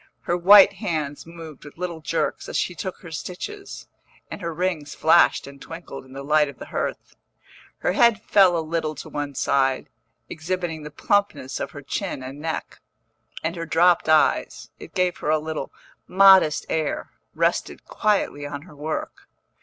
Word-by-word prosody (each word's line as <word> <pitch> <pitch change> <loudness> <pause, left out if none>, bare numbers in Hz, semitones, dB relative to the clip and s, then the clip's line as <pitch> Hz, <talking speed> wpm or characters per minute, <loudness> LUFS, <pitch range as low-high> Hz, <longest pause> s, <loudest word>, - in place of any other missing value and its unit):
Her 175 - -1
white 195 +3 +8
hands 160 -8 -4
moved 165 -4 -11
with 145 - -13
little 170 -2 -4
jerks 165 +1 -2
as - - -2
she 180 - -1
took 185 +3 -6
her 170 - -11
stitches, 395 - -7 0.4
and - - -7
her 170 -1 -3
rings 165 -4 -2
flashed 165 +2 +4
and 140 0 -12
twinkled 165 -5 -9
in 130 - -15
the 135 0 -7
light 150 0 +3
of 140 - -11
the - - -9
hearth. - - -4 0.6
Her - - 0
head 225 +3 +4
fell 190 -4 +4
a 160 - -2
little 155 -1 -2
to - - -9
one 145 -1 -4
side, 135 -1 +1 0.4
exhibiting 165 0 -4
the 150 - -7
plumpness 200 -5 -1
of - - -3
her 145 +1 -10
chin 130 - -4
and 135 +2 -8
neck, 160 +1 -5 0.6
and 165 +2 -2
her 165 -1 -5
dropped 170 0 +3
eyes 155 -1 +2
(it - - -12
gave 180 -1 +1
her 150 - -3
a 155 - +4
little 155 -2 -5 0.4
modest 190 -4 +6
air) 155 -2 -2 0.2
rested - - -1
quietly 205 -8 0
on 145 0 -7
her 155 -3 -15
work. 155 +2 -5
160 Hz, 170 wpm, -23 LUFS, 150-180 Hz, 0.6 s, white